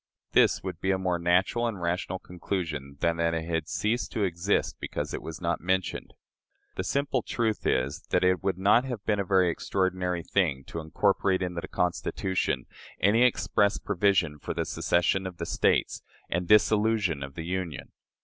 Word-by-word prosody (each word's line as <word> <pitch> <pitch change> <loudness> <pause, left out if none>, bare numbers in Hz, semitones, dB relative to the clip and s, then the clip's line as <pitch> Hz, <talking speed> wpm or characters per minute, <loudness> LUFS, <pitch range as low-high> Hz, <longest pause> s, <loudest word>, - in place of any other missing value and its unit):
This - - +4
would 90 -3 -6
be 95 - 0
a 95 - +3
more 90 -2 -1
natural 95 +7 +2
and 110 -5 -4
rational 90 +1 -2
conclusion 80 -7 -5
than 85 0 +1
that 85 0 +1
it 80 -1 -3
has 80 -1 -2
ceased 115 +3 -1
to 110 - 0
exist 90 +2 0
because - - -4
it - - -4
is 80 -2 -7
not 85 0 -1
mentioned. 95 0 -2 0.6
The - - -2
simple 140 -2 0
truth 110 -2 -1
is, 65 +3 0
that - - +2
it 90 -1 +3
would 95 -2 -1
have 115 +3 +2
been 105 -2 +1
a - - +1
very 95 -2 +3
extraordinary 90 -1 -1
thing 80 -10 0
to 85 - -4
incorporate 95 +3 +1
into 90 -1 -3
the 95 - -7
Constitution 95 +1 -1 0.3
any 105 +5 +4
express 100 -3 +3
provision 90 -6 +1
for - - -5
the - - -1
secession 90 +2 +1
of 90 -2 -8
the 85 - -4
States - - +1 0.3
and 90 +1 -1
dissolution 105 -6 +3
of 70 0 -7
the 80 - -5
Union. 85 -6 -4
90 Hz, 175 wpm, -28 LUFS, 85-100 Hz, 0.6 s, This